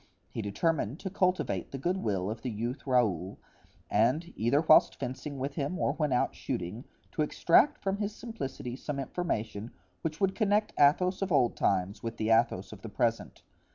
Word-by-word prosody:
He - - -4
determined 130 - -1
to 190 - -4
cultivate 180 - 0
the 135 - -4
good 175 +8 0
will 100 - -1
of 110 0 -6
the 125 - -3
youth 120 +5 -4
Raoul 105 -8 +1 0.5
and, 130 +11 +1
either 120 +7 +2
whilst 155 -1 +5
fencing 135 +3 -5
with 135 +2 -3
him 145 +5 -2
or 140 - +1
when 150 -2 -1
out 125 - +1
shooting, 95 +8 -4 0.3
to - - -2
extract 225 - +4
from 195 0 0
his 205 0 -3
simplicity 135 - -6
some 140 +2 -5
information 115 - -3 0.3
which 160 0 -3
would 195 -1 +2
connect 210 0 +1
the 145 -1 +8
Athos 180 +6 -2
of 195 -1 -1
old 130 -6 +3
times 100 +2 0
with 115 0 -5
the 110 +1 0
Athos 115 -4 +2
of 105 -2 -10
the 115 - -7
present. 115 +2 -1
135 Hz, 185 wpm, -30 LUFS, 110-170 Hz, 0.5 s, the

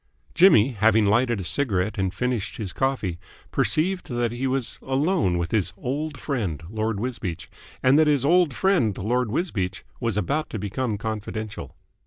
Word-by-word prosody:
Jimmy, 155 - +6
having 110 -1 +3
lighted 120 +2 +2
a - - -4
cigarette 100 0 0
and 95 -1 0
finished 125 0 -2
his 100 -5 -5
coffee, 125 -11 -1 0.3
perceived 180 +4 0
that 120 -2 0
he 125 +3 -2
was 130 -2 -2
alone 135 - +1
with 85 -1 -2
his 95 -4 0
old 145 +4 -3
friend, 100 - -3
Lord 110 -1 -1
Wisbeach, 110 -8 -4 0.3
and 130 +4 +5
that 155 - +5
his 145 -3 +2
old 175 0 +4
friend 130 - +1
Lord 120 +4 0
Wisbeach 105 - -2 0.2
was 115 -4 -1
about 145 - -1
to - - -4
become 105 +3 -2
confidential. 110 0 -5
115 Hz, 160 wpm, -24 LUFS, 100-135 Hz, 0.3 s, Jimmy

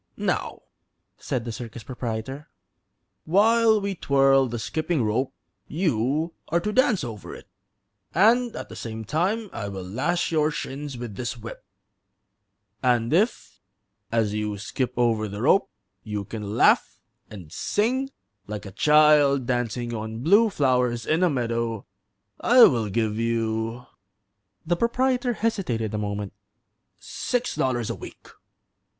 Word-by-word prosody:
"Now," - - -2 0.6
said 120 -2 -3
the 115 - -4
circus 115 0 -8
proprietor, 125 +4 -5 0.8
"while 220 +5 +4
we 200 -1 -2
twirl 135 -5 +3
the 120 0 -4
skipping 155 +5 -1
rope 115 +5 0 0.4
you 155 - 0
are 170 - +1
to 210 +5 -3
dance 250 - +3
over 110 -5 -7
it, - - -13 0.6
and 230 +6 +3
at - - -7
the - - -9
same 110 -1 -6
time 195 - 0
I 100 - -4
will 95 -2 -6
lash 130 - -1
your 155 -1 +2
shins 140 -2 -5
with 120 -4 -6
this 120 -1 -4
whip; 115 0 -9 1.2
and 120 0 +2
if, 210 +8 0 0.5
as 110 -3 +1
you 105 -1 -2
skip 120 +5 -3
over 115 -3 +2
the 100 +2 -6
rope, 190 +8 +4 0.3
you 105 +1 -4
can 105 0 -5
laugh - - +3 0.3
and 90 -7 -11
sing 255 - 0 0.4
like 105 0 -6
a 100 - -8
child 150 +1 +5
dancing 120 -1 -2
on 110 +1 -5
blue 205 +8 +5
flowers 125 - +1
in 160 +3 +1
a 180 - +4
meadow 115 -5 -2 0.5
I 245 0 +6
will 115 - +4
give 110 +1 -1
you" 115 +1 -1 0.8
the 175 +2 +1
proprietor 245 +3 +1
hesitated 175 - -1
a 105 - -1
moment 100 -1 -4 0.6
"six 245 0 -3
dollars 120 -4 0
a - - -4
week." - - -12
125 Hz, 135 wpm, -25 LUFS, 110-170 Hz, 1.2 s, I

